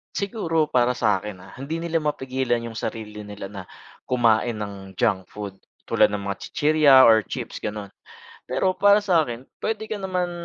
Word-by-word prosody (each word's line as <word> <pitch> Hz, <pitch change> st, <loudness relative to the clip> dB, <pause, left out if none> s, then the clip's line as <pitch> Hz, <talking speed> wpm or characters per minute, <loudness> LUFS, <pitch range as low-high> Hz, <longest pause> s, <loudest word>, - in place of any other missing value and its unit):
Siguro 165 Hz, -7 st, -1 dB
para 125 Hz, 0 st, +3 dB
sakin, 105 Hz, -4 st, -1 dB
ah. -, -, -14 dB
Hindi 140 Hz, +4 st, -4 dB
nila 165 Hz, 0 st, -1 dB
mapigilan 130 Hz, -5 st, -1 dB
yung 115 Hz, -, -6 dB
sarili 105 Hz, -1 st, -5 dB
nila 105 Hz, -1 st, -8 dB
na 100 Hz, -2 st, -7 dB, 0.4 s
kumain 120 Hz, -1 st, +2 dB
ng 100 Hz, -2 st, -7 dB
junk 100 Hz, -6 st, 0 dB
food, 100 Hz, -2 st, -8 dB, 0.2 s
tulad -, -, +4 dB
ng 100 Hz, -1 st, -4 dB
mga 100 Hz, 0 st, -4 dB
chichirya 150 Hz, -2 st, +4 dB
or 110 Hz, -2 st, +7 dB
chips 110 Hz, -, -6 dB
gano'n. 105 Hz, -2 st, -5 dB, 0.6 s
Pero 190 Hz, -, +1 dB
para 205 Hz, +2 st, +4 dB
sakin 155 Hz, -, +1 dB, 0.2 s
p'wede 220 Hz, 0 st, -3 dB
ka 215 Hz, -, -2 dB
naman 180 Hz, -2 st, -2 dB
120 Hz, 160 wpm, -24 LUFS, 105-165 Hz, 0.6 s, or